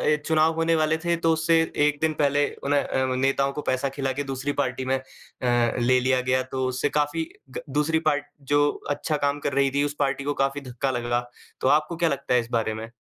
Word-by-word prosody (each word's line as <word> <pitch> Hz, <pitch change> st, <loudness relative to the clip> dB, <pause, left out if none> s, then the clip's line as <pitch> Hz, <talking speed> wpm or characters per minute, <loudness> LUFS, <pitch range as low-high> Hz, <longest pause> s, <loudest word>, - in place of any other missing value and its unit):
अ, -, -, -4 dB
चुनाव 160 Hz, 0 st, +3 dB
होने 165 Hz, 0 st, +2 dB
वाले 155 Hz, 0 st, +2 dB
थे, 170 Hz, +1 st, 0 dB
तो 165 Hz, -1 st, +1 dB
उससे 165 Hz, +1 st, +3 dB, 0.3 s
1 150 Hz, 0 st, +1 dB
दिन 160 Hz, -1 st, +2 dB
पहले 145 Hz, 0 st, +3 dB, 0.2 s
उन्ह 145 Hz, 0 st, +2 dB
अ, 130 Hz, 0 st, 0 dB
नेताओं 135 Hz, +1 st, +1 dB
को 150 Hz, -, -4 dB
पैसा 130 Hz, 0 st, -1 dB
खिला 135 Hz, -2 st, -1 dB
के -, -, 0 dB
दूसरी 135 Hz, +1 st, -3 dB
पार्टी 130 Hz, -1 st, -3 dB
में 130 Hz, 0 st, +1 dB
अ, -, -, -8 dB, 0.8 s
ले 125 Hz, +1 st, +3 dB
लिया 130 Hz, 0 st, +2 dB
गया, 130 Hz, +1 st, +1 dB
तो 130 Hz, 0 st, -3 dB
उससे 130 Hz, +3 st, -1 dB
काफी 150 Hz, +2 st, -1 dB, 0.2 s
ग 130 Hz, -, -6 dB
दूसरी 150 Hz, +3 st, +1 dB
पार्टी 145 Hz, -1 st, -4 dB
जो 145 Hz, +1 st, +3 dB, 0.2 s
अच्छा 150 Hz, +1 st, -1 dB
काम 145 Hz, 0 st, 0 dB
कर 140 Hz, -1 st, -2 dB
रही 140 Hz, -1 st, +2 dB
थी 145 Hz, -, +3 dB
उस 145 Hz, 0 st, -2 dB
पार्टी 140 Hz, -1 st, 0 dB
को 145 Hz, +1 st, -1 dB
काफी 135 Hz, +1 st, -1 dB
धक्का 130 Hz, +1 st, -3 dB
लगा। 120 Hz, 0 st, 0 dB, 0.4 s
तो -, -, +1 dB
आपको 155 Hz, +4 st, +2 dB
क्या 170 Hz, -2 st, +2 dB
लगता 140 Hz, -2 st, -2 dB
है 125 Hz, -, +5 dB
इस 115 Hz, 0 st, -5 dB
बारे 115 Hz, -2 st, 0 dB
में? 110 Hz, +1 st, -7 dB
140 Hz, 230 wpm, -25 LUFS, 130-150 Hz, 0.8 s, है